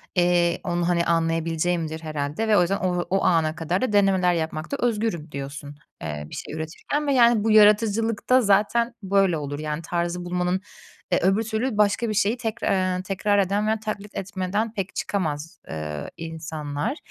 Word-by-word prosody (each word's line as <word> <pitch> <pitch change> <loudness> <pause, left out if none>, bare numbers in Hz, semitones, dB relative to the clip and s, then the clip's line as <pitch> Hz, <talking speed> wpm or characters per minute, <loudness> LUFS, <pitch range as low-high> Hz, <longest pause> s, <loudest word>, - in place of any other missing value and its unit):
eee, 175 -1 +2
onu, 175 -1 -1
hani, 170 -1 +2
anlayabileceğimdir 165 0 0
herhâlde 155 +6 -3
ve 215 -1 +4
o - - +6
yüzden 185 +3 +1
o 180 -1 0
o 195 +1 +1
ana 160 -3 +2
kadar 170 +3 -1
da 255 -5 -1
denemeler 190 -3 +4
yapmakta 160 - -3
özgürüm 215 -9 -1
diyorsun, 140 +1 -7 0.3
eee, 75 -2 -5
bir - - -8
şey - - -7
üretirken 160 - -3
ve 280 - +3
yani 235 -4 +5
bu 225 - +2
yaratıcılıkta 215 +3 +4
zaten 220 +3 +2
böyle 195 -3 +2
olur; 145 -1 -5
yani 150 0 -3
tarzı 175 +1 -2
bulmanın 180 +1 -1 0.5
eee, - - +3
öbür 195 +5 +2
türlü 225 +1 -2
başka 210 +2 +2
bir - - -1
şeyi 210 +3 +1
tekrar, 200 -5 0
eee, 185 - -5
tekrar 205 +2 +1
eden 200 +2 +1
veya 220 0 +1
taklit 210 -1 -6
etmeden 200 +3 -2
pek 195 -4 -4
çıkamaz, 165 -3 -3
eee, 75 -1 -5
insanlar. 160 - -4
185 Hz, 170 wpm, -24 LUFS, 160-210 Hz, 0.5 s, o